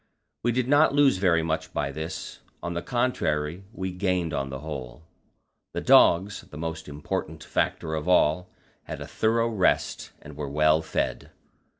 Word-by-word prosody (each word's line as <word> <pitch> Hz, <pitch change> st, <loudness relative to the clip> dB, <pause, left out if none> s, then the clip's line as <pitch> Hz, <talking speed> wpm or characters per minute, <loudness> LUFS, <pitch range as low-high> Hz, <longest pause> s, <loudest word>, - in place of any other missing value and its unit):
We 120 Hz, -, +1 dB
did 125 Hz, +1 st, 0 dB
not 145 Hz, +1 st, +4 dB
lose 145 Hz, -7 st, +5 dB
very 85 Hz, -4 st, +3 dB
much 80 Hz, 0 st, -2 dB
by 70 Hz, -, -1 dB
this; 80 Hz, +3 st, -6 dB, 0.2 s
on 85 Hz, -, -3 dB
the 85 Hz, -, -2 dB
contrary, 90 Hz, -9 st, -1 dB
we 95 Hz, -5 st, -4 dB
gained 90 Hz, -3 st, -1 dB
on 70 Hz, -1 st, -2 dB
the 65 Hz, +1 st, -6 dB
whole. 70 Hz, -2 st, -7 dB, 0.7 s
The -, -, -2 dB
dogs 95 Hz, +4 st, +5 dB
the 75 Hz, -, -13 dB
most 80 Hz, 0 st, -5 dB
important 75 Hz, +1 st, -4 dB
factor 80 Hz, -, -1 dB
of 80 Hz, 0 st, -3 dB
all 90 Hz, 0 st, +3 dB, 0.4 s
had -, -, -6 dB
a -, -, -6 dB
thorough 115 Hz, +1 st, +1 dB
rest, 105 Hz, -5 st, 0 dB
and 75 Hz, -1 st, -12 dB
were 75 Hz, -1 st, -4 dB
well 75 Hz, +2 st, +3 dB
fed. 80 Hz, -, -2 dB
80 Hz, 165 wpm, -26 LUFS, 75-100 Hz, 0.7 s, lose